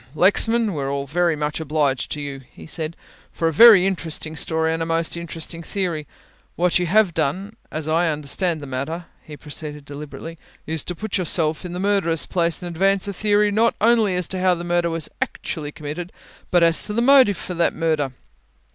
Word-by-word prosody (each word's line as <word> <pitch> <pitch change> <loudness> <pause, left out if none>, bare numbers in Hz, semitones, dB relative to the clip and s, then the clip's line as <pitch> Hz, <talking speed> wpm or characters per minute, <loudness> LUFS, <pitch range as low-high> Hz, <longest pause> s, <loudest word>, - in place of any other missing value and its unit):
"Lexman, 220 +5 +3
we're 140 -3 -3
all 140 0 -2
very 170 +3 +1
much 150 0 -3
obliged 150 -4 0
to 150 - -5
you," 140 -2 -6
he - - -13
said, 160 0 -5 0.4
"for 165 - -1
a 165 - 0
very 210 0 +8
interesting 160 -4 -3
story 160 +1 0
and 165 - -3
a - - 0
most 165 0 0
interesting 165 0 -6
theory. 170 -4 -3 0.5
What 180 0 +2
you 180 - -1
have 200 0 +3
done, 180 +8 -2 0.2
as 155 0 -4
I 165 +2 +2
understand 155 +3 -1
the - - -7
matter," 140 +6 -4 0.2
he 150 -1 -11
proceeded 150 -1 -6
deliberately, 150 +3 -9 0.3
"is 160 0 -1
to 180 - -4
put 210 +1 -3
yourself 160 -1 +1
in 175 - -6
the 180 - -4
murderer's 190 -5 +2
place 170 -1 0
and - - -4
advance 195 +2 +2
a 200 - -3
theory 210 +1 +2
not 225 +3 +2
only 220 -4 +3
as 180 -2 0
to 190 - -3
how 185 -1 +3
the 170 - -6
murder 175 0 +1
was 165 -2 -3
actually 150 -2 -4
committed, 155 +5 -6 0.4
but 175 -1 +4
as 165 -1 +3
to 210 - -4
the 235 - +1
motive 260 -7 +6
for 180 - -6
that 170 -1 +1
murder. 155 -4 0
165 Hz, 200 wpm, -22 LUFS, 155-185 Hz, 0.5 s, very